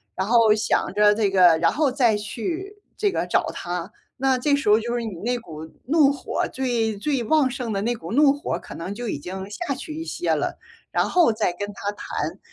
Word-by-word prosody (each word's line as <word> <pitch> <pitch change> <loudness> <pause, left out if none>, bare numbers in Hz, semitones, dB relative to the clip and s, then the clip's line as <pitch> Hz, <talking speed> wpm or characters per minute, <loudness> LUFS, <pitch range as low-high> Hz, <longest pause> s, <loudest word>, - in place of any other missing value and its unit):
然 190 +2 -2
后 225 -2 +5
想 210 - 0
着 210 0 +5
这 210 -2 +1
个 180 -4 +6
然 165 0 +3
后 295 -3 +1
再 240 -6 +3
去 350 - -5 0.2
这 410 -2 +1
个 - - -2
找 - - +1
他。 175 +2 -5 0.3
那 265 0 +2
这 285 +2 +2
时 275 -7 -1
候 215 +2 +6
就 235 +2 -3
是 235 - -2
你 220 -4 -4
那 245 0 +1
股 160 -6 -9 0.2
怒 300 -2 +5
火 280 - -2
最 235 -5 -1
最 275 +3 -1
旺 300 -2 +3
盛 245 -5 -4
的 195 - -1
那 240 +3 0
股 205 -2 -7
怒 285 0 +6
火 285 +1 -3
儿 - - -1
可 - - -10
能 185 +5 -6
就 240 -1 -4
已 140 - -3
经 190 +4 -6
下 275 +5 -3
去 305 +3 -7
一 325 +1 -5
些 345 - -1
了， - - -1 0.4
然 - - +1
后 340 -11 +4
再 215 -5 0
跟 205 +3 -5
他 200 +1 -3
谈。 205 - -5
230 Hz, 245 characters per minute, -23 LUFS, 205-280 Hz, 0.4 s, 个